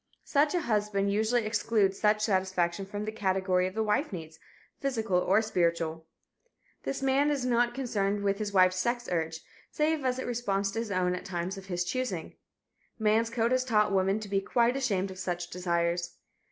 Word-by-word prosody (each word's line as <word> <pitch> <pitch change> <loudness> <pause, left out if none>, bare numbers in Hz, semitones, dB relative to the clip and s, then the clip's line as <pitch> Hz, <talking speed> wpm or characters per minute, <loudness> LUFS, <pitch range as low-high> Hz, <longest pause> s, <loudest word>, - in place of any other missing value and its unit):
Such 295 +3 +2
a 350 - +1
husband 210 -5 0
usually 220 +2 +1
excludes 215 -3 +1
such 210 0 +3
satisfaction 190 -2 0
from 205 +1 -4
the 215 - -3
category 190 -3 +1
of 185 - -8
the 220 - +1
wife's 215 +8 0
needs, 160 -3 -8 0.4
physical 225 -9 0
or 200 +4 +3
spiritual. 170 -5 -1 0.7
This 270 0 -4
man 270 +2 +3
is 280 -4 0
not 240 -1 +2
concerned 205 -6 -1
with 200 0 +1
his 210 -1 -2
wife's 185 -1 +4
sex 240 +4 -1
urge, 160 -1 -2 0.3
save 305 -1 0
as 255 -1 0
it 260 - -4
responds 200 -5 -1
to 225 - -3
his 230 -1 -3
own 185 -2 +1
at 180 - -4
times 180 +1 -3
of 195 0 -10
his 175 -1 -1
choosing. 200 -6 -3 0.6
Man's 220 +1 +2
code 230 0 0
has 255 0 +2
taught 215 -5 +2
woman 195 +2 +2
to 215 - -6
be 195 0 0
quite 240 +4 +2
ashamed 200 -8 0
of 185 - -10
such 175 -1 -3
desires. 175 -1 -1
205 Hz, 185 wpm, -29 LUFS, 185-235 Hz, 0.7 s, wife's